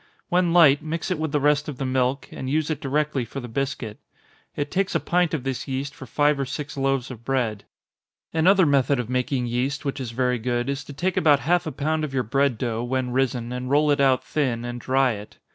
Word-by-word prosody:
When 175 -1 +2
light, 160 -4 +6
mix 165 +4 -3
it 180 - -1
with 160 -1 -2
the 150 - +1
rest 145 +1 +2
of 140 - -6
the 135 - -3
milk, 130 +1 0
and 130 - -5
use 155 +2 0
it 155 - -3
directly 145 -1 0
for 120 +4 -7
the 120 - -7
biscuit. 120 -3 -3 0.6
It 145 0 -3
takes 195 +1 0
a - - +4
pint 175 -1 +1
of 140 - -4
this 135 0 -3
yeast 135 +1 -3
for 135 - -11
five 145 -1 +2
or 135 - 0
six 150 +2 -5
loaves 135 -2 0
of 115 -2 -10
bread. 120 -5 -1 0.7
Another 185 +3 +5
method 140 -2 +2
of 125 0 -4
making 125 0 0
yeast, 130 +5 -2
which 140 0 -2
is 125 - -4
very 125 +1 0
good, 120 +2 -1
is 140 0 -4
to 145 - -9
take 180 +6 -1
about 145 -3 +4
half 175 +2 +1
a - - -2
pound 155 +3 -1
of 140 -3 -4
your 130 - +1
bread 135 +1 +1
dough, 115 -1 -2
when 125 0 -1
risen, 125 -2 0
and 125 0 -4
roll 150 +2 +3
it 145 0 +2
out 130 -2 +3
thin, 125 -6 -1
and 120 0 -5
dry 130 +1 +2
it. 105 -1 -8
135 Hz, 235 wpm, -24 LUFS, 125-150 Hz, 0.7 s, light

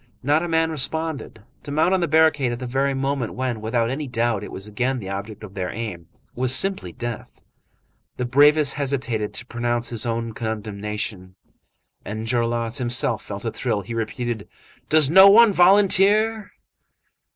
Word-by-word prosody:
Not 145 +4 +2
a 175 - -3
man 160 -1 +1
responded. 160 -3 -3 0.2
To - - -10
mount 160 +5 +2
on 190 - +2
the 170 - 0
barricade 155 -4 +3
at 120 - -4
the 125 - -6
very 135 +2 -1
moment 135 -3 -2
when, 125 -4 -3
without 115 +1 -1
any 145 +2 -4
doubt, 115 -4 -1
it - - -8
was 95 - -8
again 125 +5 -2
the 100 -6 -7
object 100 +2 -7
of 100 -3 -10
their 95 -2 -4
aim, 90 -7 -6 0.3
was 130 +1 0
simply 190 - 0
death. 120 +3 -7 0.8
The 125 - -2
bravest 145 +3 +4
hesitated 130 -7 -2
to 120 - -2
pronounce 120 0 -2
his 115 -1 -2
own 115 0 -3
condemnation. 105 -3 -5 0.7
Enjolras 115 +2 -2
himself 120 -1 +1
felt - - -7
a - - -1
thrill. 100 - -2
He 100 +5 -8
repeated:— 115 0 -4 0.4
"Does 155 -2 +4
no 190 +3 +9
one 220 +1 +6
volunteer?" 205 +4 +4
120 Hz, 165 wpm, -22 LUFS, 110-150 Hz, 0.8 s, no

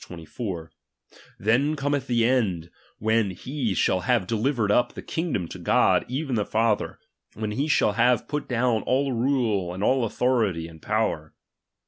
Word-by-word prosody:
24): 85 +1 -7 0.7
Then 125 +9 +2
cometh 145 -1 -1
the 120 -2 +2
end, 95 -10 0 0.3
when 110 -1 +1
he 125 +2 -3
shall 95 - +2
have 120 -1 +1
delivered 115 +1 0
np 120 +3 +2
the - - -7
kingdom 160 - -2
to - - -8
God - - +3
even 135 +2 -3
the 105 -3 +1
Father, 110 0 0 0.4
when 110 -1 -3
he 135 +8 -1
shall 145 - +3
have 120 +2 +2
put 150 0 -3
down 120 -2 +1
all 135 +4 0
rule, 115 -7 0
arid 90 +3 -4
all 125 -1 +2
autltority, 110 -11 0
and 80 -1 -14
power. 105 -8 -1
115 Hz, 155 wpm, -25 LUFS, 100-130 Hz, 0.7 s, God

